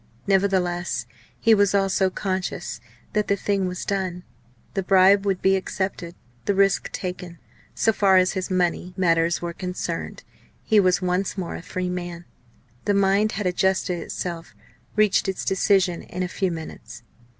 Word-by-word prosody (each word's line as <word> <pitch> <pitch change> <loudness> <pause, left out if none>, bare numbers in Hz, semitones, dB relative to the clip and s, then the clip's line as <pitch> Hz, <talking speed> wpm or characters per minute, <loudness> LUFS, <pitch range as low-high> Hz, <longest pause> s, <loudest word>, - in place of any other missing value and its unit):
Nevertheless, 180 -9 +1 0.3
he 230 - +5
was 205 -1 +3
also 195 -1 +2
conscious 185 0 -3 0.3
that 210 -1 +1
the 200 - +2
thing 200 -1 0
was 180 -1 -5
done. 185 -3 -2 0.5
The 195 - 0
bribe 195 +2 +5
would 190 -2 0
be 190 0 +5
accepted, 190 -2 -3 0.3
the 200 - +1
risk 195 0 +2
taken. 180 -2 -5 0.4
So 225 - +2
far 195 -3 +4
as 185 0 +4
his 185 -1 -3
money 180 0 0
matters 170 -2 +2
were 170 0 -3
concerned 180 +1 -5 0.4
he 215 -2 +4
was 185 -1 +3
once 180 +2 -1
more 180 -3 -3
a - - -6
free 180 +1 -3
man. 175 -1 -5 0.6
The 205 - +2
mind 200 +2 +3
had 205 0 -3
adjusted 180 -1 +1
itself, 170 -1 -6 0.4
reached 210 -2 +3
its 190 - -3
decision 190 -2 +2
in 180 +1 -5
a - - -1
few 190 +1 -1
minutes. 160 -2 -8
185 Hz, 155 wpm, -24 LUFS, 180-195 Hz, 0.6 s, he